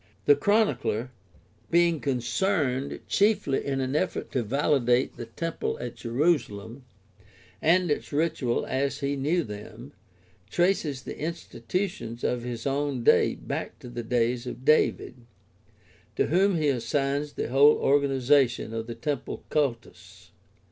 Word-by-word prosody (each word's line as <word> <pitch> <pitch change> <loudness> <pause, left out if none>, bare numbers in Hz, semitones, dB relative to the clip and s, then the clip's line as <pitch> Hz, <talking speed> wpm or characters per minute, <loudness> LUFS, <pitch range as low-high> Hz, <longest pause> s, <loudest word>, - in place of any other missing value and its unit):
The 430 - +7
Chronicler, 205 - +1 0.6
being 170 -1 +3
concerned 140 +1 -1
chiefly 200 -9 +2
in 135 -1 -2
an 130 +2 -2
effort 185 +4 -1
to 130 - 0
validate 125 0 +1
the 120 - -7
temple 165 +8 -3
at 120 -1 -5
Jerusalem 120 -3 -1 0.8
and 175 0 +3
its - - -2
ritual 150 -5 0
as 140 +2 -2
he 140 0 -1
knew 155 +6 0
them, 110 +4 -9 0.6
traces 165 - 0
the - - -8
institutions 155 - -4
of 125 - 0
his 120 -1 -6
own 140 -2 -1
day - - +4
back - - -5
to 125 - -11
the 120 0 -5
days 120 +1 0
of 125 +1 -7
David, 150 -4 +2 1.0
to - - +2
whom 190 +4 +3
he 155 -3 +1
assigns 140 +3 -1
the - - -3
whole 140 +4 +6
organization 135 -4 +2
of 115 0 -4
the 115 - -6
temple 140 +3 -4
cultus. 140 -6 -3
140 Hz, 130 wpm, -27 LUFS, 120-155 Hz, 1.0 s, The